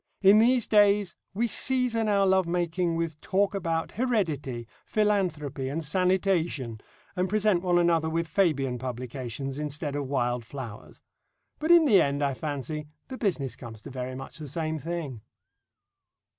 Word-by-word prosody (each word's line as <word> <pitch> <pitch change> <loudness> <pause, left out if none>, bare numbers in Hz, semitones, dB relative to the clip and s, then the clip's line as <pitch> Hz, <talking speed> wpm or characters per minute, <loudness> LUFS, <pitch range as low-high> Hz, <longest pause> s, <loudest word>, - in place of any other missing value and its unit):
In 200 +2 +8
these 245 +1 +4
days 205 -3 +4 0.2
we 230 +5 0
season 245 -3 +1
our 200 -1 +3
love 190 -2 +3
making 175 0 0
with 165 -2 -3
talk 200 +2 +1
about 165 -4 -2
heredity, 160 - -1 0.2
philanthropy, 175 -11 0
and 160 +4 -3
sanitation, 170 - 0 0.3
and 180 +1 0
present 210 -3 +2
one 175 -1 +2
another 165 -2 +3
with 165 +1 -1
Fabian 145 -8 +1
publications 130 +2 -5
instead 150 0 -3
of 145 -2 -2
wild 125 -3 0
flowers. 115 -3 -9 0.6
But 315 - -2
in 340 -2 +7
the 210 -9 +6
end, 140 +1 0
I 140 -1 +1
fancy, 150 +2 -4 0.2
the 260 - -6
business 145 - -1
comes 115 -4 -10
to - - -9
very 130 0 -5
much 135 +4 -8
the 150 - -7
same 155 +2 -2
thing. 155 -8 -5
165 Hz, 150 wpm, -27 LUFS, 135-195 Hz, 0.6 s, In